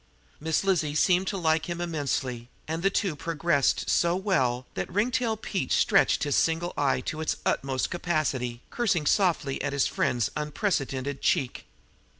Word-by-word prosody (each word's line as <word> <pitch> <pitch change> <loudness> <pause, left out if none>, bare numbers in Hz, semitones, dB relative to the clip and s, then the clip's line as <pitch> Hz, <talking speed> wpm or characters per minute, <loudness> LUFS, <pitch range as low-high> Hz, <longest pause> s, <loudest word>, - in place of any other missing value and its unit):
Miss 160 +3 0
Lizzie 170 -7 +1
seemed 180 +4 +3
to 195 - -1
like 160 -2 +1
him 170 0 -3
immensely, 135 -7 -2 0.2
and 160 +1 -3
the 195 - +3
two 195 -4 -1
progressed 155 -2 0
so 170 0 +2
well 130 -11 0
that 90 - -4
Ringtail 225 +1 0 0.3
stretched - - +3
his 145 -2 0
single 165 +2 +1
eye 135 -3 +1
to 155 +4 -4
its 160 - 0
utmost 135 -1 0
capacity, 145 -9 -1
cursing 200 -10 0
softly 165 -7 +1
at 140 0 -2
his 140 -2 +2
friend's 120 -3 0
unprecedented 140 -4 -2
cheek. 125 - 0
155 Hz, 150 wpm, -27 LUFS, 135-175 Hz, 0.3 s, seemed